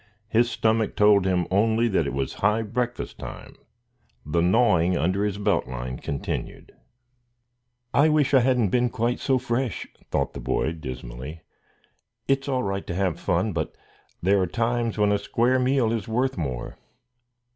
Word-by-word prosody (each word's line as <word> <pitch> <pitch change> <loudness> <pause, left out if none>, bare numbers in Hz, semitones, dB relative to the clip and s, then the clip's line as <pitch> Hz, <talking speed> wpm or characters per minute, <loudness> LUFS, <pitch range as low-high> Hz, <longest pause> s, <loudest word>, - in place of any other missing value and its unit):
His 120 +2 +3
stomach 110 -2 +1
told 105 -2 +5
him 90 -2 +1
only 110 +4 +3
that 85 -7 +1
it - - -3
was 70 0 -2
high 105 +3 +2
breakfast 120 +3 -3
time. - - -9 0.7
The 85 +3 +1
gnawing 90 -3 +3
under 95 +6 +1
his 105 -1 -1
belt 100 0 +1
line 65 0 -5
continued. 70 -1 -5 1.2
"I 150 +3 +5
wish 150 -3 +2
I 135 - +7
hadn't 125 -4 +2
been 125 +4 +2
quite 120 +2 -1
so 135 -2 +2
fresh!" 125 -3 -2 0.2
thought - - -1
the - - -7
boy, 65 +5 0
dismally. 65 0 -7 0.9
"It's 135 +1 +1
all 130 -2 0
right 95 0 -3
to 85 - -3
have 95 -3 0
fun, - - 0
but - - -3 0.5
there 100 +2 +3
are 90 - +1
times 115 +3 -1
when 105 -1 +3
a 100 - +2
square 120 +5 +1
meal 130 -3 +2
is 115 -3 -3
worth 125 +4 0
more." 65 -8 -4
105 Hz, 160 wpm, -25 LUFS, 85-120 Hz, 1.2 s, I